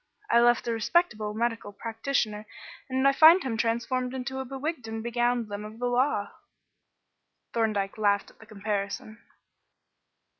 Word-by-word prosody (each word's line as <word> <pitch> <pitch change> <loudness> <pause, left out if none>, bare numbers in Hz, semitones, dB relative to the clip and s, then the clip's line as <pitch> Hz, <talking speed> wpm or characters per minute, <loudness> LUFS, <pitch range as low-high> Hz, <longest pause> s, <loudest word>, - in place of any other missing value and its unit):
I 235 - +6
left 240 0 +3
a - - +1
respectable 220 -4 0
medical 230 -2 -2
practitioner 220 -1 -2 0.4
and 260 +1 +2
I - - +6
find 320 +6 +7
him 250 -4 -2
transformed 245 +3 -1
into 265 +1 -4
a 265 - -4
bewigged 270 -1 -4
and 225 0 -5
begowned 240 0 0
limb 205 0 -6
of 215 +1 -9
the 245 - -3
law." 245 -4 +1 1.2
Thorndyke 215 -3 -1
laughed 200 -1 +1
at - - -28
the 220 - -15
comparison. 210 +1 -4
230 Hz, 145 wpm, -27 LUFS, 215-255 Hz, 1.2 s, find